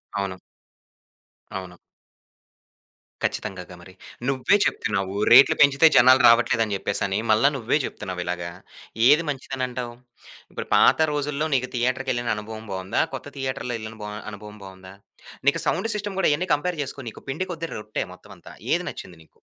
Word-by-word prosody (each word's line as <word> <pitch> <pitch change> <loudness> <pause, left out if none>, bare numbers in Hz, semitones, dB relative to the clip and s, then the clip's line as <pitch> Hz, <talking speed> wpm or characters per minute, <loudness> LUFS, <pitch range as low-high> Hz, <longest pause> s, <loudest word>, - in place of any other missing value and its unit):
అవును. 100 -2 -3 1.2
అవును. 90 -2 -7 1.5
ఖచ్చితంగాగా 90 -1 -4
మరి. 95 +1 -14 0.4
నువ్వే 135 +9 +3
చెప్తున్నావు 95 -4 -1 0.2
రేట్లు 130 +3 +8
పెంచితే 140 +2 +6
జనాలు 130 +1 +7
రావట్లేదని 115 -2 +3
జెప్పేసని. 100 +1 -1
మళ్ళా 110 +6 +5
నువ్వే 120 +2 +1
జెప్తున్నావిలాగ. 90 -5 -4 0.7
ఏది 150 +4 +6
మంచిదనంటావు? 130 -3 -4 0.6
ఇప్పుడు - - -6
పాత - - +5
రోజుల్లో 145 +1 -1
నీకు 125 -1 0
థియేటర్‌కెళ్ళిన 125 0 -1
అనుభవం 110 +1 -8
బావుందా? 95 0 -1
కొత్త - - -8
థియేటర్‌లో 130 -2 -3
యెళ్లిన 110 0 -8
బ - - -5 0.3
అనుభవం 105 +1 -10
బావుందా? 95 0 -12 0.5
నీకు - - +4
సౌండ్ 225 - 0
సిస్టమ్ 205 -2 -4
ఇయన్ని 175 +5 -1
కంపేర్ 165 +3 -1
జేసుకో. 140 +1 -7
నీకు - - -14
పిండి 180 +8 -2
కొద్ది 165 -1 -4
రొట్టె 105 0 -4
మొత్తం 90 - -16
అంతా. - - -14 0.2
ఏది - - +1
నచ్చింది 90 -2 -10
నీకు? 80 - -30
120 Hz, 135 wpm, -24 LUFS, 100-140 Hz, 1.5 s, రేట్లు